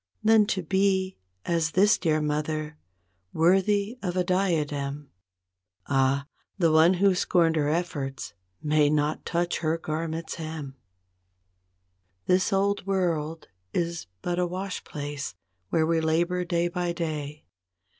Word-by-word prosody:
Than 215 -1 +5
to 190 -3 -1
be 190 +1 +1 0.3
as 165 -1 +1
this 205 +3 +5
dear 155 -3 +1
mother, 150 +1 -2 0.5
worthy 200 +7 +2
of 180 -2 -2
a 180 - +3
dia¬ 180 -4 +1
dem— 145 0 -5 0.7
Ah, 135 0 +2 0.3
the 170 -4 +3
one 160 +4 +5
who 195 +1 +4
scorned 170 -2 +2
her 150 -2 +1
efforts, 140 -9 -3 0.3
may 150 -1 +3
not 150 0 0
touch 175 0 0
her 160 0 0
garment's 160 +1 -4
hem. 155 -4 -6 1.5
This 180 0 +2
old 200 0 +1
world 165 -5 -1 0.3
is 170 - -2 0.2
but 175 0 -1
a 180 - +1
wash 185 +2 -4
place, 145 - -5 0.3
where 160 +6 +2
we 165 0 +1
labor 170 +3 +1
day 170 0 +1
by 175 0 -2
day. 155 -3 -4
165 Hz, 130 wpm, -26 LUFS, 150-180 Hz, 1.5 s, Than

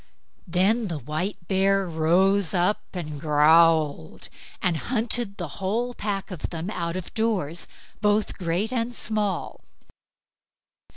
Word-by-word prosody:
Then 200 +6 +2
the 170 -4 -3
white 155 - -4
bear 195 0 +2
rose 175 +4 +2
up 180 +4 +2
and 150 -5 -5
growled, 155 - +3 0.3
and 180 -2 +1
hunted 230 -1 0
the 175 - -4
whole 230 +6 -1
pack 200 -3 -3
of 180 - -4
them 170 +4 -4
out 170 -3 -3
of 185 - -7
doors, 190 -8 -1 0.3
both 210 0 +1
great 185 +7 -1
and 240 0 -1
small. 210 -5 -2
185 Hz, 120 wpm, -25 LUFS, 165-210 Hz, 0.3 s, growled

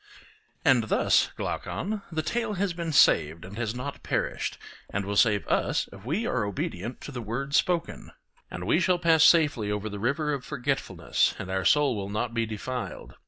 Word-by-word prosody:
And 125 -4 +5
thus, - - +3
Glaucon, 210 +3 -3
the 160 -1 -2
tale 230 +6 -1
has 195 -1 -1
been 170 -1 -3
saved 80 - +4
and 95 +2 -10
has 115 -1 -2
not 130 +3 -6
perished, - - -2 0.3
and 100 0 -2
will 100 +1 -3
save 105 -2 +3
us - - +1
if 100 -1 -12
we 165 - -1
are 125 - 0
obedient 100 +2 -4
to - - -7
the 125 -3 -5
word 125 +6 -4
spoken; 170 +2 0 0.4
and 90 - -6
we 160 - +3
shall 180 0 +3
pass 165 -3 +4
safely 150 -11 +4
over 105 +1 -2
the 105 0 -6
river 140 +7 0
of 135 -3 -4
Forgetfulness 135 +2 -1
and 95 - -6
our 95 -1 -1
soul 145 +1 +4
will 100 -1 -4
not 110 +3 -2
be 115 -1 0
defiled. 120 +3 -5
125 Hz, 185 wpm, -27 LUFS, 105-160 Hz, 0.4 s, And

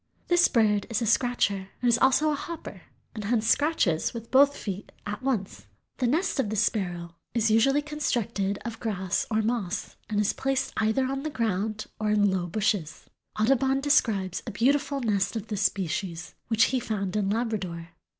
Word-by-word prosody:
This 350 0 +5
bird 210 -4 +2
is 230 -2 0
a - - 0
scratcher. 210 -4 +1
It - - -4
is 240 0 +4
also 300 +4 +4
a - - 0
hopper 335 +3 -7 0.3
and 215 -3 -6
hence 225 0 +1
scratches 235 - +2
with 230 0 -8
both 280 +2 +5
feet 200 -1 -6
at 210 +2 -4
once. 240 -8 -2 0.3
The 250 - +1
nest 320 +5 0
of 225 - +1
this 215 0 +1
Sparrow 175 -6 -2 0.2
is 225 -1 +2
usually 270 +6 +4
constructed 230 -9 -1
of 230 -1 -5
grass 190 -4 -1
or 220 0 +1
moss 220 -4 -2
and 210 -1 0
is 210 - +2
placed 270 0 -1
either 220 +4 +2
on 270 +1 -2
the 310 - -3
ground 215 -4 -2
or 215 -1 0
in 205 -1 +3
low 180 -2 -1
bushes. 190 -3 -2 0.3
Audubon 265 +4 +3
describes 210 - +1
a - - -3
beautiful 275 +5 +1
nest 205 -3 0
of 220 -1 -5
this 210 -2 -2
species 180 -3 -2
which 225 -1 +3
he 260 - +2
found 205 -4 -3
in 205 -2 +1
Labrador. 200 -7 -2
220 Hz, 180 wpm, -27 LUFS, 200-260 Hz, 0.3 s, This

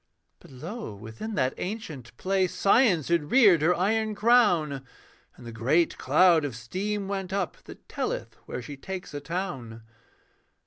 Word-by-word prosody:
But - - -17
Lo, 160 - -7
within 110 - -7
that 130 -2 +1
ancient 160 - -6
place 190 -1 0
Science 195 - +3
had 165 -4 +1
reared 205 - +6
her 175 +3 +3
iron 215 +4 0
crown, 200 - +3 0.5
And - - -14
the 115 - -7
great 135 +10 +1
cloud 160 +3 +4
of 140 -5 -4
steam 195 - -3
went 195 -2 -4
up 195 -3 -2
That - - -13
telleth - - -3
where 125 - -5
she 140 +3 -8
takes 190 +5 -7
a 145 - -4
town. 140 -10 -5
175 Hz, 150 wpm, -27 LUFS, 135-200 Hz, 0.5 s, reared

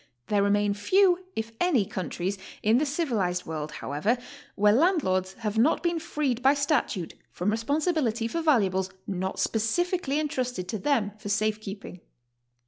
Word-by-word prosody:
There 205 -1 +3
remain 205 0 +2
few, 365 - +3
if 220 +1 -3
any, 290 - +3
countries 185 +2 -3 0.2
in 220 +3 +4
the 300 - 0
civilized 225 - -1
world, 155 -1 -5
however, 150 - 0 0.4
where 210 0 +4
landlords 215 - +2
have 220 0 -2
not 275 +8 +3
been 340 -1 +1
freed 295 -7 -2
by 270 +3 +5
statute 280 - 0 0.2
from 185 +4 -1
responsibility 240 -1 0
for' 335 +8 -2
valuables 195 - +2 0.2
not 190 0 -3
specifically 290 - 0
en 310 - 0
trusted 250 -9 -3
to 215 - -2
them 250 -7 +1
for 210 -1 -6
safe 215 +1 0
keeping. 195 -3 -8
225 Hz, 150 wpm, -27 LUFS, 200-295 Hz, 0.4 s, by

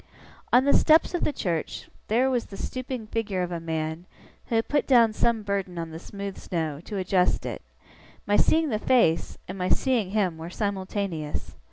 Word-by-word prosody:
On 250 +2 +5
the 280 - +4
steps 315 +3 +5
of 350 - -1
the - - +2
church, 170 - -3 0.2
there 240 +5 +3
was 245 -2 0
the 195 - -9
stooping 255 -1 -4
figure 210 -4 -2
of 180 - -4
a 170 - -2
man, 160 +1 -3 0.4
who 230 - -1
had 225 - +2
put 290 -1 +1
down 235 -4 +5
some 225 0 +1
burden 195 -3 -2
on 165 -1 -4
the 160 - -7
smooth 200 +1 -7
snow, 160 -4 -3
to 210 - -5
adjust 185 -1 +1
it; - - -4 0.6
my 205 - +2
seeing 320 +5 +3
the 215 -4 0
face, 225 -10 +2
and 185 +1 -6
my 180 - 0
seeing 245 -8 +2
him, 190 -5 0
were 165 +1 -6
simultaneous. 190 -5 -3
200 Hz, 190 wpm, -26 LUFS, 175-235 Hz, 0.6 s, On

